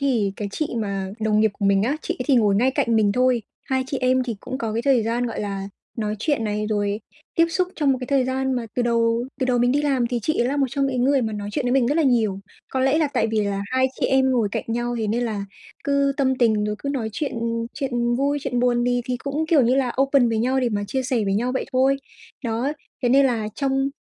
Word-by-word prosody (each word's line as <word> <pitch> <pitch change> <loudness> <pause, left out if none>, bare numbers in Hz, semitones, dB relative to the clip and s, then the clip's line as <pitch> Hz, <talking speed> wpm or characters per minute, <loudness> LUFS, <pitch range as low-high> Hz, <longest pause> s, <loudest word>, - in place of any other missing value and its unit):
thì 235 -8 +1
cái 205 - -4
chị 310 - -1
mà 195 -3 -3
đồng 215 -1 +2
nghiệp 220 0 +3
của 205 - -2
mình 195 0 +3
á, 265 +7 0
chị - - -2
ấy - - -1
thì 280 - +4
ngồi 210 -4 +3
ngay 245 +6 +3
cạnh 260 -4 +1
mình 210 -2 +3
thôi. 250 -1 +2 0.2
Hai 260 -1 0
chị 270 0 -3
em 255 0 +3
thì 240 -4 -4
cũng 260 - -5
có 225 -5 -3
cái 230 +2 -1
thời 260 -3 +3
gian, 235 +2 -1
gọi 230 - -4
là, 195 -1 -4 0.3
nói 215 -2 -2
chuyện 275 0 0
này, 210 0 -1
rồi 205 0 -1 0.3
tiếp 330 -1 +4
xúc 360 +2 0
trong 285 -3 +3
một 255 - -2
cái 250 - -4
thời 275 -2 +2
gian 265 +1 -1
mà 245 -2 -2
từ 250 - +1
đầu 230 0 +1 0.2
từ 260 - +1
đầu 250 -1 +2
mình 245 +1 +3
đi 290 +2 +1
làm 270 -5 +1
thì 245 0 -1
chị 310 - 0
ấy 240 - +2
là 285 - -1
một 275 - +2
trong 275 0 0
cái 260 -2 -2
người 265 +2 +3
mà 220 -1 -2
nói 205 -1 -4
chuyện 285 - -1
với 245 - +1
mình 260 -2 +3
rất 285 - +1
là 330 - +3
nhiều. 225 -8 +2 0.3
Có 260 - -2
lẽ 270 +4 +3
là 310 -2 +2
tại 220 - +2
vì 220 -1 0
là 200 -1 -2
hai 260 0 +3
chị - - +2
em 265 0 +3
ngồi 235 -5 +2
cạnh - - -2
nhau 240 +1 -2
thế 220 - -1
nên 230 +4 0
là 210 -4 -3 0.4
cứ 280 -1 +2
tâm 265 -1 +2
tình 220 -3 +3
rồi 210 0 -1
cứ 280 - -5
nói 260 -6 -2
chuyện 280 +6 -3 0.4
chuyện 240 -3 -1
vui, 285 +2 +1
chuyện 250 -3 -1
buồn 240 -1 +2
thì 245 0 +2
thì 250 0 -2
cũng, 285 +5 -3
kiểu 310 -5 +4
như 245 +2 +3
là, 260 -3 +1
open 275 -3 +3
với 225 -1 0
nhau 255 +4 +1
để 250 - +1
mà 205 -2 -2
chia 265 +5 -1
sẻ 245 -4 0
với 195 0 0
nhau 245 +4 0
vậy 260 - -1
thôi. 265 +2 +3 0.5
Đó, 235 +5 -1 0.3
thế 245 - +2
nên 270 +2 +5
là 225 -4 -1
trong 270 -1 0
245 Hz, 275 wpm, -23 LUFS, 220-270 Hz, 0.5 s, nên